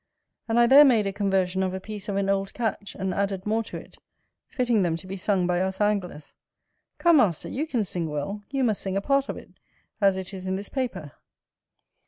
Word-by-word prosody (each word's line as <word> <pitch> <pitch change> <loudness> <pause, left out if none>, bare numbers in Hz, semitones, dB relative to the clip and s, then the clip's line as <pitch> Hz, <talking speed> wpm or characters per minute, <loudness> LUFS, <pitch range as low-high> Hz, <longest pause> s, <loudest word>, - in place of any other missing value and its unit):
And 230 +1 +2
I 240 - +6
there 270 +4 +9
made 235 -7 +4
a 195 - -2
conversion 190 -2 0
of 190 0 -1
a - - -3
piece 210 +1 -7
of 200 - -2
an 195 0 0
old 195 0 -1
catch, 215 -4 -3
and 190 -1 -2
added 195 -1 -2
more 220 +2 +1
to - - -7
it, - - -13 0.5
fitting 240 -4 +1
them 170 -3 +1
to 165 - -8
be 190 +1 -5
sung 190 -1 0
by 175 0 +1
us 190 0 -2
anglers. 195 -7 -1 0.6
Come, 340 -2 +5
Master, 200 - +2
you 300 +5 -3
can 240 -8 0
sing 175 -4 -3
well: 150 +8 -4
you 275 -1 -1
must 220 -5 +1
sing 195 0 -2
a - - 0
part 275 +4 +1
of - - -4
it, - - -12 0.5
as 195 -1 +4
it 190 +1 -6
is 185 -1 -6
in 190 - 0
this 200 +1 -5
paper. 200 - -4
195 Hz, 225 wpm, -25 LUFS, 185-225 Hz, 0.6 s, there